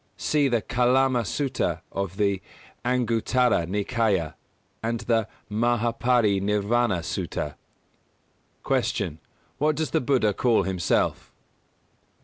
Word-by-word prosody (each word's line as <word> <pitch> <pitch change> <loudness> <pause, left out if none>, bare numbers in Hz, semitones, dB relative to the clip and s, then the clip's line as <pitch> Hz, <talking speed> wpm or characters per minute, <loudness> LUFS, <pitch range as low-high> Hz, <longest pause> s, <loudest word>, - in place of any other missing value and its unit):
(See 150 -2 +2
the 120 -4 0
Kālāma 125 0 +2
Sutta 135 +1 -1
of 95 -1 -4
the 100 -2 +1 0.4
Anguttara 120 -4 +1
Nikāya, 100 -3 0 0.5
and 115 0 -2
the 115 -2 +1 0.2
Mahā 115 +2 0
Pari 120 -5 +3
Nirvāna 105 -1 +1
Sutta.) 75 -2 -3 1.1
197. 75 - 0
Q. - - -30 0.4
_What 155 0 +3
does 160 -1 -2
the - - +2
Buddha 125 -5 +2
call 115 -1 +2
himself? 95 -2 0
115 Hz, 110 wpm, -25 LUFS, 100-125 Hz, 1.1 s, Pari